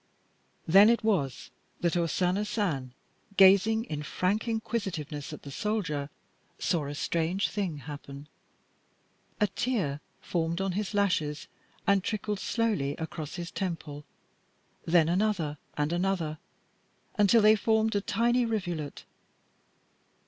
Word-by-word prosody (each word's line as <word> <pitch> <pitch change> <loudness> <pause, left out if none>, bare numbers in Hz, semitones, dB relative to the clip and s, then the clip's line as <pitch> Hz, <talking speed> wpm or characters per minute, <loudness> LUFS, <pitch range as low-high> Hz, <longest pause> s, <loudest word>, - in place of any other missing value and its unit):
Then 195 +6 +8
it 235 0 +2
was 135 - 0 0.3
that 170 0 +1
O 170 -1 +2
Sana 185 +4 +1
San, 175 - -2 0.5
gazing 200 +4 +6
in 150 -11 -5
frank 185 +8 -1
inquisitiveness 195 -11 -3
at 150 - -9
the 140 - -8
soldier, 165 -8 -2 0.5
saw 160 -6 0
a 145 - -5
strange 170 +5 0
thing 190 -7 -2
happen. 145 0 -9 1.1
A 210 - +4
tear 195 - -1 0.2
formed 170 0 -2
on 195 0 0
his 205 +2 -3
lashes 165 -7 0 0.4
and 200 -2 +3
trickled 210 -1 -2
slowly 205 -14 0
across 160 -2 -6
his 175 -1 -5
temple; 165 -6 -4 0.8
then 165 -1 +5
another 175 -5 0 0.2
and 150 +2 0
another, 175 -4 -1 0.8
until 210 +2 +5
they 215 +1 +7
formed 220 0 +1
a 200 - +2
tiny 240 +4 +2
rivulet. 175 -10 -3
180 Hz, 120 wpm, -29 LUFS, 150-210 Hz, 1.1 s, Then